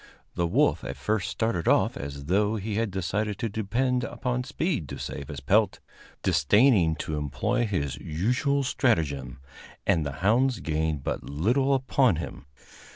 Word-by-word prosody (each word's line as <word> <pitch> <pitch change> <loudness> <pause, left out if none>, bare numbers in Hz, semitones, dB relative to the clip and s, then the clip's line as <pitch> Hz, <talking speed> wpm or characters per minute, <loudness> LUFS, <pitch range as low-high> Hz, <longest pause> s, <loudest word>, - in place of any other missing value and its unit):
The 85 -1 0
wolf - - +2
at - - -5
first 110 -2 -1
started 110 -7 -1
off - - +3
as 70 0 -6
though 105 +6 +2
he 105 0 -3
had 110 +1 0
decided 95 +2 -2
to 115 - -2
depend 120 +5 0
upon 125 -1 -2
speed 140 - -2
to - - -6
save 70 - -6
his 75 -3 -7
pelt, 100 +8 +2 0.4
disdaining 90 - +4
to 80 -1 -4
employ 75 - -1
his 75 -9 -2
usual 125 - 0
stratagem, 75 - 0 0.5
and 90 -5 +2
the 70 -1 -4
hounds 125 +4 +3
gained 80 -2 -1
but - - -3
little 120 - +1
upon 130 -4 +2
him. 80 -3 -7
100 Hz, 155 wpm, -27 LUFS, 80-120 Hz, 0.5 s, disdaining